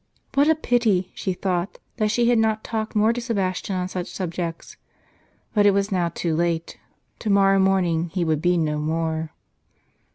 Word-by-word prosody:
What 285 +3 +4
a 320 - +5
pity, 230 -10 +1
she 190 - -2
thought, 180 0 -2 0.2
that 215 -2 +1
she 235 +2 +2
had 240 -1 +4
not 220 -1 +1
talked 220 0 -4
more 215 +2 +4
to 245 - -4
Sebastian 195 -5 -2
on 180 0 -1
such 185 -1 -4
subjects! 170 -2 -5 0.8
But 205 -2 +4
it 200 - +4
was 200 +1 0
now 175 -3 +1
too 165 -1 -2
late; 170 0 -1 0.4
to 215 - -3
morrow 195 -1 +4
morning 180 -3 +2
he 175 0 -1
would 155 -2 0
be 180 +1 +2
no 150 -2 0
more. 160 0 -2
185 Hz, 175 wpm, -23 LUFS, 170-215 Hz, 0.8 s, a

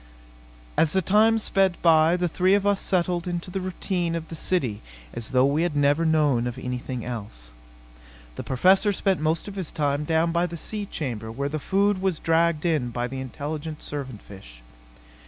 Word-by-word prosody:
As 160 - +3
the 190 - +3
time 215 +5 +4
sped 195 -4 +1
by 165 +1 +5
the 180 0 0
three 185 +3 +2
of 200 0 0
us 200 -1 +2
settled 175 -1 0
into 175 +1 -4
the 190 +1 -3
routine 180 -2 -2
of 165 -1 -5
the 165 - -6
city 135 - -1 0.3
as 115 - -5
though 130 0 +3
we 145 +3 +1
had 170 -3 -1
never 145 +3 +2
known 145 -7 +2
of 120 - -5
anything 125 -1 -5
else. 100 - -7 0.8
The - - -5
Professor 190 - +3
spent 195 -1 0
most 160 +4 0
of 200 - -6
his 190 -5 -4
time 145 -1 -1
down 160 +2 +1
by 170 +1 +1
the 170 0 -7
sea 205 +4 -4
chamber 115 - -4
where 140 +5 -3
the 155 +1 -3
food 200 +4 +1
was 190 -4 0
dragged 165 0 +1
in 155 -8 +1
by 120 +1 -2
the 130 +1 -6
intelligent 150 +4 -6
servant 135 -7 -6
fish. - - -13
160 Hz, 190 wpm, -25 LUFS, 130-180 Hz, 0.8 s, by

